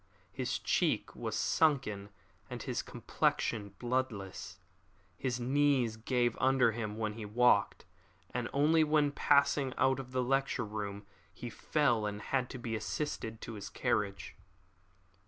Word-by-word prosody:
His - - -2
cheek - - 0
was - - -3
sunken 125 -11 +1 0.4
and - - -6
his - - -2
complexion 100 -3 -1
bloodless. 110 -7 -3 0.6
His 125 +3 -2
knees 130 -2 +2
gave 120 +1 0
under 130 -3 +4
him 110 -1 -4
when 110 -1 -1
he 110 0 -7
walked; 120 +4 +3 0.5
and 120 -1 -2
once 155 +3 +4
when 150 -1 +3
passing 140 -2 +3
out 130 0 +3
of 135 - -6
his 130 - -14
lecture 135 -2 +1
room 100 -1 -5 0.3
he 120 - -7
fell 120 -6 +1
and 105 0 -4
had 130 +2 -1
to - - -6
be 120 -2 -3
assisted 110 0 -3
to 115 - -6
his 105 -1 -7
carriage. 105 -5 -1
120 Hz, 135 wpm, -33 LUFS, 105-135 Hz, 0.6 s, under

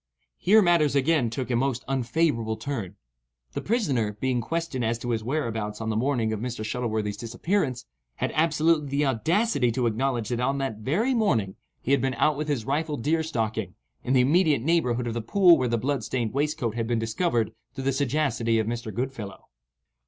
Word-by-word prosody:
Here 215 +3 +5
matters 165 -5 +3
again 140 -3 +2
took 125 +2 -4
a - - +2
most 130 0 -1
unfavourable 125 -3 0
turn. 110 -10 -4 0.6
The - - -3
prisoner, 135 - 0
being 130 -1 0
questioned 165 -3 -2
as 115 +1 0
to 120 +1 -4
his 110 -2 -1
whereabouts 115 -6 -2
on 110 0 -2
the - - -2
morning 115 -2 0
of 110 - -3
Mr. 120 -2 -4
Shuttleworthy's 110 -3 -2
disappearance, 125 - -1 0.3
had - - -2
absolutely 155 -1 +2
the 140 +2 +1
audacity 140 - +1
to 125 0 0
acknowledge 120 0 0
that 120 -1 -1
on 135 +3 0
that 135 -5 -2
very 170 - 0
morning 115 - +1 0.3
he 130 - -1
had 140 -2 +4
been 130 -1 0
out 155 +5 +2
with 150 +2 -3
his 135 -7 -1
rifle 150 +2 -1
deer 155 +7 +1
stalking, 115 -9 -2 0.3
in 125 - 0
the 130 - +5
immediate 150 -1 +3
neighbourhood 125 -7 +1
of 115 - -2
the 120 - -2
pool 175 - +5
where 130 - 0
the 115 - +1
blood 135 +1 -1
stained 115 -1 -2
waistcoat 145 -4 -1
had 115 -1 -2
been 120 0 +1
discovered 115 - 0 0.2
through 135 - -5
the 135 - +2
sagacity 130 -4 +1
of 110 - +1
Mr. 115 0 -4
Goodfellow. 115 -3 -5
130 Hz, 190 wpm, -26 LUFS, 115-150 Hz, 0.6 s, Here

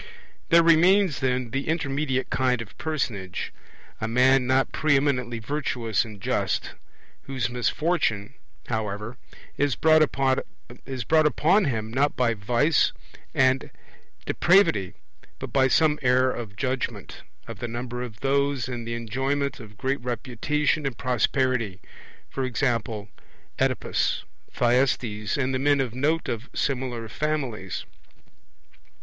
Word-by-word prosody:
There 170 0 +6
remains, 175 +1 +5
then, 125 -2 -1
the 135 +2 -2
intermediate 140 -5 -1
kind 125 -2 +1
of 115 -3 -8
personage, 115 - -3 0.5
a 110 - -1
man 125 +2 +4
not 130 +1 +2
pre 155 -2 +2
eminently 125 -4 0
virtuous 120 -3 -1
and 110 -4 -10
just, - - -1 0.5
whose 130 -3 -2
misfortune, 125 - 0 0.3
however, 110 +1 -3 0.4
is 140 -3 +1
brought 155 +3 +5
upon 140 - +1
him 110 -5 -2
not 140 +3 +2
by 120 -2 +2
vice 120 +9 +2 0.4
and 130 0 +3 0.6
depravity 105 - +3 0.4
but - - -7
by 130 -1 +4
some 150 +3 +3
error 130 0 +3
of 110 -5 -6
judgement, 130 +2 -3 0.3
of 115 -3 -8
the 120 - -3
number 120 +1 -5
of 115 -4 -7
those 140 -1 +1
in 120 -2 -5
the 115 0 -3
enjoyment 135 +5 -2
of 105 -3 -12
great 135 +2 -1
reputation 140 +5 -1
and 125 -4 -5
prosperity; 125 -4 0 0.6
e.g. 130 +2 -1 0.9
Oedipus, - - 0 0.3
Thyestes, 120 -4 +1
and 135 -1 0
the 130 - 0
men 145 +1 +3
of 130 -4 -1
note 150 +6 0
of 115 +3 -4
similar 125 -4 -2
families. 130 -9 -3
130 Hz, 120 wpm, -25 LUFS, 115-140 Hz, 0.9 s, There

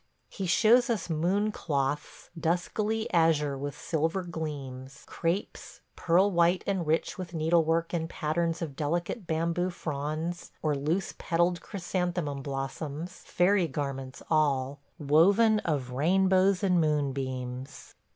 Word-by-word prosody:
He 195 -3 -4
shows 235 +7 +5
us 200 -7 -1
Moon 190 +7 +1
cloths, 145 -5 -3
duskily 205 +7 -1
azure 160 -4 +3
with 140 +1 -5
silver 165 +4 -1
gleams;... 140 -5 -6
crapes, 170 +4 -3
pearl 185 +4 +3
white 175 +1 +3
and 190 -5 -1
rich 160 +5 0
with 175 -2 -6
needlework 165 +1 +2
in 165 -1 -1
patterns 165 +1 -1
of 145 -4 -6
delicate 170 - -2
bamboo 170 +3 0
fronds 155 +1 -4
or 155 -1 +2
loose 155 +7 -1
petalled 175 +1 +1
chrysanthemum 180 -6 -3
blossoms,... 140 +5 -5
fairy 180 0 +3
garments 135 -3 -5
all, 140 -3 +1 0.2
woven 195 +10 +4
of 140 -9 -2
rainbows 190 +7 +3
and 180 -3 +3
moonbeams! 135 -4 -3
165 Hz, 120 wpm, -29 LUFS, 145-180 Hz, 0.2 s, shows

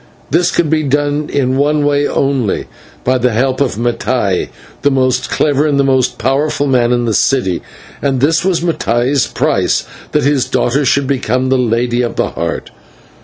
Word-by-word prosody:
This 175 +3 +3
could 170 - +1
be 155 -1 +2
done 145 +1 -1
in 130 -2 0
one 145 +1 +1
way 145 0 +2
only, 135 -7 0 0.4
by 130 0 +1
the 125 -1 +1
help 130 +4 0
of 135 -6 0
Mattai, 120 -4 -1 0.3
the 145 - +3
most 130 -2 0
clever 145 0 +1
and 140 -2 +1
the - - +4
most 130 -2 +1
powerful 140 +4 0
man 125 -3 +2
in 120 -1 +1
the 115 - 0
city, 100 -8 +1 0.4
and 135 -2 0
this 160 +6 +2
was 185 -3 +1
Mattai's 135 -5 0
price, - - 0 0.3
that 150 - +2
his 140 -1 +2
daughter 135 +4 0
should 140 +2 +2
become 130 -1 -1
the 130 - +3
Lady 120 0 0
of 120 - -2
the - - 0
Heart. - - -4
135 Hz, 175 wpm, -14 LUFS, 125-145 Hz, 0.4 s, the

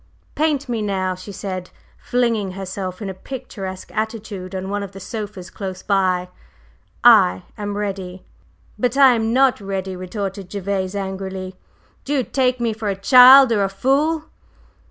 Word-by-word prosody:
"Paint 295 -2 0
me 235 -3 -2
now!" 190 -3 -1
she 185 +3 -9
said, 185 -2 -5 0.3
flinging 230 -6 -1
herself 190 0 -5
in 195 - -4
a - - -7
picturesque 190 -4 -8
attitude 215 -4 -4
on 190 0 -4
one 205 0 -1
of 200 -1 -7
the 195 - -9
sofas 200 -2 -7
close 190 -2 -6
by; 185 -3 +1 0.8
"I 90 +1 +6
am 205 -1 -4
ready." 190 -3 -5 0.5
"But 250 +1 0
I 270 -2 +7
am 225 -1 0
not 260 -2 +3
ready!" 195 -1 -4
retorted 190 +1 -5
Gervase, 195 -1 -2
angrily. 190 -1 -5 0.5
"Do 285 - -3
you 270 -3 +2
take 255 0 0
me 235 -2 0
for 215 0 -5
a 195 - -1
child, 255 +5 +8
or 205 -3 +2
a 195 - 0
fool?" 285 +10 +1
200 Hz, 155 wpm, -20 LUFS, 190-235 Hz, 0.8 s, child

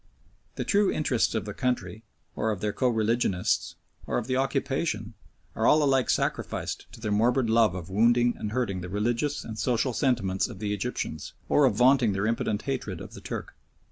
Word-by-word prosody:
The - - -2
true 205 -1 +3
interests 125 -7 +1
of 110 -3 -1
the 105 - -5
country, 110 -5 -2 0.3
or 110 - 0
of 105 -3 -2
their 105 0 -2
co 130 - +1
religionists, 110 -4 0 0.3
or - - 0
of 120 - -2
the 130 +1 -1
occupation, 135 -3 -1 0.4
are - - +1
all 155 0 +5
alike 135 -3 +2
sacrificed - - -1
to - - -11
their 110 -2 -3
morbid 115 +3 +2
love 110 -5 +4
of 90 0 -7
wounding 120 +4 +4
and 105 - -5
hurting 110 -6 -1
the 90 - -6
religious 120 +8 -1
and 110 -1 -7
social 125 +3 +1
sentiments 110 -9 +1
of 115 - -9
the 105 +1 -2
Egyptians, 100 -7 -4
or 145 - +4
of 120 -6 +2
venting 125 -2 +4
their 95 +2 -1
impotent 110 -1 -1
hatred 125 - -3
of - - -9
the - - -10
Turk. - - -6
115 Hz, 190 wpm, -27 LUFS, 105-130 Hz, 0.4 s, all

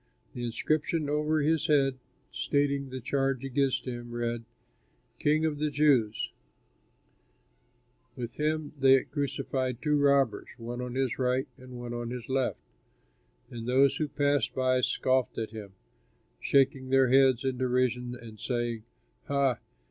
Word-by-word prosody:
The 120 - -5
inscription 155 +5 -1
over 150 +1 +1
his 155 +1 +1
head 135 -3 +2 0.3
stating 140 +3 0
the 130 0 -5
charge 135 +1 -1
against 135 -1 0
him 120 -2 -6
read: 120 -1 -3 0.7
THE - - -15
KING 155 +2 +3
OF 150 -2 -1
THE 150 0 +1
JEWS 140 -8 +2 1.8
With 120 -2 -6
him 155 0 -1
they 135 0 +6
crucified 135 -3 -2
two 150 +1 +1
robbers, 140 -4 +2
one 120 +1 -5
on 125 0 -5
his 130 -2 -1
right 130 +2 +1
and 125 -1 -11
one 120 0 -6
on 120 -1 -4
his 125 -1 -6
left. 130 -1 0 0.9
And 115 -1 -6
those 135 +2 +4
who 155 - -1
passed 145 -3 0
by 130 -1 +2
scoffed 130 0 +1
at 110 -1 -3
him, 105 -3 -9 0.7
shaking 135 -1 +2
their 135 -1 +4
heads 130 -1 +4
in 130 -2 -1
derision 125 -1 0
and 110 -2 -11
saying, 120 0 -2 0.4
"Ha! 140 -4 +1
130 Hz, 140 wpm, -29 LUFS, 120-140 Hz, 1.8 s, they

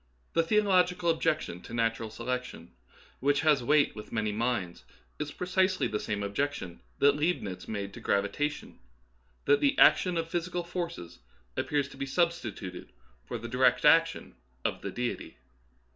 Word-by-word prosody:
The 165 - +4
the 190 +6 +3
ological 180 -4 +3
objection 155 - -1
to 115 - -8
natural 115 -1 0
selection, 125 -5 -5 0.5
which 145 +2 +2
has 150 -4 +4
weight 145 +3 +3
with 105 -1 -9
many 110 -2 0
minds, 105 -5 -2 0.4
is 150 -1 -3
precisely 185 +2 +1
the 105 - -2
same 105 -1 -3
objection 100 -4 -3 0.2
that 145 0 +5
Leibnitz 150 - -2
made 100 -2 -4
to - - -9
gravitation, 100 +10 -1 0.3
— - - -38
that 145 - +5
the 280 - +2
action 180 -2 +5
of 165 0 -1
physical 175 +1 -2
forces 170 - -5 0.4
appears 145 -2 0
to 135 - -13
be 135 0 -3
substituted 170 - -2 0.4
for - - -3
the 115 +1 -7
direct 125 +4 +3
action 165 +2 +4 0.3
of - - -1
the - - -4
Deity. 120 - -4
140 Hz, 155 wpm, -29 LUFS, 110-165 Hz, 0.5 s, that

